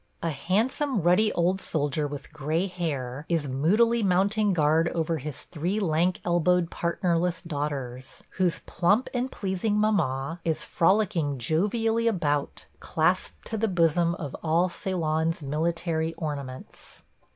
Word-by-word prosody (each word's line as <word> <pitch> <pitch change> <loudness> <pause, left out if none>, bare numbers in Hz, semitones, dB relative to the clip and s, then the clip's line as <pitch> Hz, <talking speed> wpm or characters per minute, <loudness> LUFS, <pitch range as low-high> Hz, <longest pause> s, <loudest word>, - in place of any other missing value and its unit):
A 165 - 0
handsome 215 - 0
ruddy 190 +5 +4
old 180 +3 +1
soldier 145 -1 0
with 145 +1 -8
gray 160 +4 -1
hair 145 -8 -4
is 165 -4 0
moodily 210 - +2
mounting 200 +2 +2
guard 160 0 +3
over 165 -1 0
his 145 +1 -6
three 180 +6 -2
lank 175 -1 +1
elbowed 175 0 +2
partnerless 175 0 0
daughters, 140 -5 -5
whose 180 -3 +2
plump 205 +8 +2
and 255 +1 -1
pleasing 200 +2 -1
mamma 165 -7 0
is 160 -2 -1
frolicking 170 -6 +1
jovially 220 - +1
about, 150 -9 -1
clasped - - 0
to 225 - -4
the 225 - +2
bosom 170 -2 +2
of 150 -5 -6
all 170 +3 +2
Ceylon's 165 -3 -1
military 165 +2 -1
ornaments. 140 -5 -7
170 Hz, 130 wpm, -26 LUFS, 150-190 Hz, -, ruddy